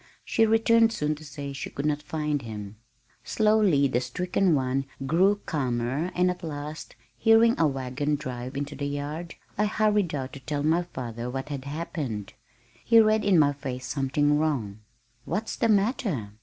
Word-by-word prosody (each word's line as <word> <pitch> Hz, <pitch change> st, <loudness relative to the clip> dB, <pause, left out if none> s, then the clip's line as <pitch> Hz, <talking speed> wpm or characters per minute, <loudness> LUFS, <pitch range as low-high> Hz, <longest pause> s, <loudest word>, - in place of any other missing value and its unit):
She 225 Hz, 0 st, +3 dB
returned 225 Hz, +1 st, +4 dB
soon 150 Hz, -8 st, -1 dB
to 155 Hz, +1 st, -10 dB
say 145 Hz, -2 st, -7 dB
she 135 Hz, -, -5 dB
could 140 Hz, -, -5 dB
not 150 Hz, -1 st, 0 dB
find 150 Hz, -1 st, -2 dB
him. 105 Hz, -3 st, -7 dB, 0.5 s
Slowly 210 Hz, -10 st, +3 dB
the 125 Hz, -2 st, 0 dB
stricken 180 Hz, +5 st, +1 dB
one 135 Hz, 0 st, 0 dB, 0.2 s
grew 190 Hz, +8 st, +3 dB
calmer 130 Hz, +2 st, -1 dB
and 180 Hz, 0 st, +3 dB
at 180 Hz, -, -8 dB
last, 150 Hz, -1 st, -6 dB, 0.2 s
hearing 225 Hz, +1 st, +5 dB
a 165 Hz, -, +5 dB
wagon 135 Hz, +2 st, -1 dB
drive 130 Hz, -1 st, -6 dB
into 145 Hz, +1 st, -3 dB
the 145 Hz, -, -3 dB
yard, 145 Hz, +4 st, -5 dB, 0.2 s
I 210 Hz, -, +4 dB
hurried 210 Hz, -5 st, +1 dB
out 130 Hz, -1 st, -4 dB
to 140 Hz, -, -8 dB
tell 145 Hz, +2 st, -3 dB
my 160 Hz, +3 st, +3 dB
father 120 Hz, -8 st, -6 dB
what 135 Hz, +2 st, -5 dB
had 140 Hz, -2 st, -5 dB
happened. 140 Hz, -, -4 dB, 0.5 s
He 230 Hz, -1 st, +6 dB
read 215 Hz, 0 st, +4 dB
in 200 Hz, -3 st, +4 dB
my 145 Hz, -2 st, +4 dB
face 130 Hz, -2 st, -6 dB
something 145 Hz, +2 st, +1 dB
wrong. 120 Hz, -10 st, -1 dB, 0.5 s
"What's 220 Hz, +1 st, -2 dB
the 230 Hz, -, +1 dB
matter?" 200 Hz, -, +1 dB
150 Hz, 170 wpm, -26 LUFS, 135-180 Hz, 0.5 s, He